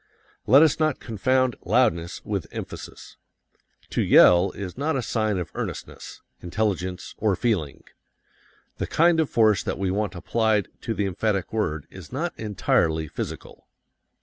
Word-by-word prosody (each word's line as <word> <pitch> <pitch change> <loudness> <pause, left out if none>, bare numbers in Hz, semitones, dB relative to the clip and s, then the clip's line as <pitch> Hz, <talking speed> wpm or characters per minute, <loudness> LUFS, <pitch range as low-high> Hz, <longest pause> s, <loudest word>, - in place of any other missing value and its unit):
Let 135 +7 +8
us 160 -1 +2
not 155 -3 +1
confound 130 +3 0
loudness 85 +1 +1
with - - -3
emphasis. - - -9 0.7
To - - 0
yell 90 +2 +6
is 95 -3 -6
not 145 +4 -1
a 130 - -1
sign 110 -3 0
of 90 -3 -4
earnestness, - - -7 0.2
intelligence, 90 -1 -2
or 105 -3 +2
feeling. 90 - -1 1.0
The - - -2
kind 170 0 +3
of 160 - +1
force 110 -3 +3
that - - -3
we 95 -1 -1
want 105 0 -2
applied 110 +3 0
to 115 -2 -3
the 100 - 0
emphatic 100 +1 -1
word 80 -9 -1
is 95 -4 -11
not 160 +6 -2
entirely 80 -6 0
physical. - - -7
105 Hz, 145 wpm, -24 LUFS, 90-125 Hz, 1.0 s, Let